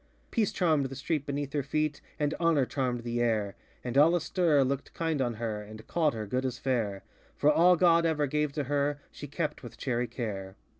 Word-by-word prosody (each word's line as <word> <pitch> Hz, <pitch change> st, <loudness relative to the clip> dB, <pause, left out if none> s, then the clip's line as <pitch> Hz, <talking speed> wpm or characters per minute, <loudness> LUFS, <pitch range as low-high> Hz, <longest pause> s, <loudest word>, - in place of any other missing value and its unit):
Peace 220 Hz, -4 st, +1 dB
charmŌĆÖd 155 Hz, -7 st, +1 dB
the 135 Hz, -, -7 dB
street 145 Hz, +2 st, -2 dB
beneath 140 Hz, -1 st, -3 dB
her 145 Hz, -, +1 dB
feet, 150 Hz, +2 st, -1 dB, 0.2 s
And 150 Hz, 0 st, 0 dB
Honor 165 Hz, -5 st, +3 dB
charmŌĆÖd 125 Hz, -3 st, -2 dB
the 120 Hz, 0 st, -1 dB
air; 110 Hz, -4 st, 0 dB, 0.3 s
And 125 Hz, 0 st, -4 dB
all 165 Hz, +4 st, +6 dB
astir 165 Hz, -4 st, +2 dB
looked 135 Hz, +1 st, -3 dB
kind 160 Hz, -4 st, 0 dB
on 120 Hz, -3 st, 0 dB
her, 110 Hz, -1 st, -3 dB
And 110 Hz, +1 st, -11 dB
called 155 Hz, -7 st, +1 dB
her 110 Hz, -1 st, -4 dB
good 125 Hz, +6 st, -1 dB
as 125 Hz, -2 st, -3 dB
fairŌĆö 110 Hz, -7 st, -1 dB, 0.4 s
For 150 Hz, -, +4 dB
all 175 Hz, +4 st, +6 dB
God 170 Hz, -1 st, +4 dB
ever 160 Hz, -3 st, +1 dB
gave 150 Hz, +1 st, 0 dB
to 145 Hz, -1 st, -1 dB
her 145 Hz, +1 st, 0 dB
She 145 Hz, -, -8 dB
kept 150 Hz, +1 st, -3 dB
with 120 Hz, -, -10 dB
chary 125 Hz, -2 st, -1 dB
care. 100 Hz, -5 st, -5 dB
140 Hz, 205 wpm, -29 LUFS, 120-155 Hz, 0.4 s, all